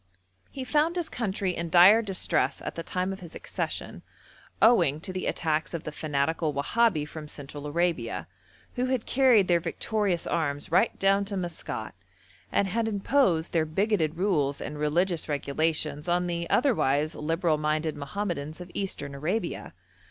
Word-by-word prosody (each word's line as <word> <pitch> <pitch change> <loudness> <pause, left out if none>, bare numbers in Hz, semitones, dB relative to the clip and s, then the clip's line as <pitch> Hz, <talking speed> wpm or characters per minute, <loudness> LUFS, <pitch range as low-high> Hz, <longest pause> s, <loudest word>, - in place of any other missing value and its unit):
He 265 - -6
found 300 +6 +1
his 345 -3 -1
country 195 -5 -2
in 170 0 -3
dire 185 +6 +7
distress 195 -4 +1
at - - -4
the 165 - -5
time 185 +3 -2
of 190 - -9
his 170 -2 -10
accession, - - -4 0.6
owing 170 - +5
to 185 +3 -5
the 185 - -3
attacks 160 0 -1
of 165 - -5
the 150 - -5
fanatical 150 +1 -1
Wahabi 155 +1 +1
from 155 0 -8
Central 145 0 -8
Arabia, 145 - -1 0.5
who 250 - +1
had 255 -3 -1
carried 250 -7 +4
their 175 -1 +4
victorious 185 +2 -1
arms 145 -4 -1
right 180 +3 +3
down 195 +1 +3
to 200 0 -4
Maskat, 175 -3 -5 0.6
and 200 - +2
had 225 +4 -1
imposed 200 - +1
their 165 -2 +3
bigoted 165 0 0
rules 155 -8 +1
and 150 0 -6
religious 165 +3 0
regulations 150 +2 -1
on 175 +1 +1
the 170 -1 -3
otherwise 155 - +2
liberal 165 0 0
minded 155 +1 0
Mohammedans 155 0 -4
of 180 0 -9
Eastern 150 -8 -3
Arabia. 165 +11 -3
170 Hz, 155 wpm, -27 LUFS, 150-195 Hz, 0.6 s, dire